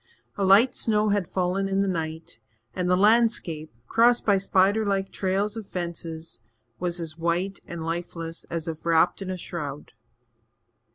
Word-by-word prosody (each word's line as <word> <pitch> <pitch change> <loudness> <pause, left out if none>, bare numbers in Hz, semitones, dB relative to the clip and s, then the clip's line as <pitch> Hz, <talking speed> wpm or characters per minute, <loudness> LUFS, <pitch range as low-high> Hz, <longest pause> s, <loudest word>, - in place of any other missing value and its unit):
A 200 - -1
light 200 +7 +6
snow 215 -1 +1
had 200 -4 +1
fallen 185 +1 0
in 195 0 +1
the 200 - +1
night 160 -6 -4 0.4
and 180 -1 -1
the 180 - +4
landscape, 205 -7 +2
crossed 235 - +4
by 200 -2 +4
spider 195 +3 +3
like 195 -2 -1
trails 195 +2 -1
of 220 -3 -7
fences, 165 -3 -5 0.4
was 175 -1 -2
as 165 -1 -6
white 175 +4 -1
and 170 -1 -6
lifeless 165 0 -4
as 165 0 -4
if 160 -1 -5
wrapped 170 +3 +3
in 190 - -5
a 185 - -3
shroud. 150 -5 -6
180 Hz, 160 wpm, -26 LUFS, 165-200 Hz, 0.4 s, light